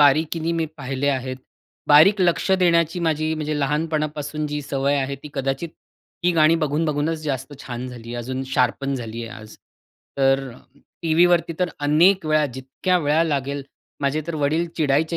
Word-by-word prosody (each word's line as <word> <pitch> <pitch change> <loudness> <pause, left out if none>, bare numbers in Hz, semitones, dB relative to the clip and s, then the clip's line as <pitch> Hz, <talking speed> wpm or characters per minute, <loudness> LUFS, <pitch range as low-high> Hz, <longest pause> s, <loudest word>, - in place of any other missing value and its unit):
बारीकीने 160 +3 +3
मी 165 -1 0
पाहिले 135 0 -2
आहेत. 130 -1 -1 0.5
बारीक 175 +8 +7
लक्ष 170 0 +2
देण्याची 170 -1 +2
माझी, 155 -1 0
म्हणजे 155 -1 -2
लहानपणापासून 150 0 -1
जी 150 0 -3
सवय 140 +1 0
आहे, 135 +1 -2
ती 150 - -8
कदाचित 135 +4 -2 0.5
ती 180 - +3
गाणी 160 0 +5
बघून-बघूनच 155 0 0
जास्त 135 -1 -3
छान 125 -1 -6
झाली, 120 -1 -8
अजून 130 +2 -4
शार्पन 135 +2 +1
झाली 115 -2 -5
आहे 115 +1 -9
आज. 110 - -13 0.6
तर 135 0 +2 0.5
टीव्हीवरती 170 +1 +3 0.2
अनेक 160 +6 +4
वेळा, 155 0 +3
जितक्या 130 +8 -1
वेळा 150 +1 +2
लागेल 140 -2 -2 0.4
माझे 140 +2 0
तर 170 - -3
वडील 155 +3 +1
चिडायचे 155 +2 +1
150 Hz, 145 wpm, -22 LUFS, 135-160 Hz, 0.6 s, बारीक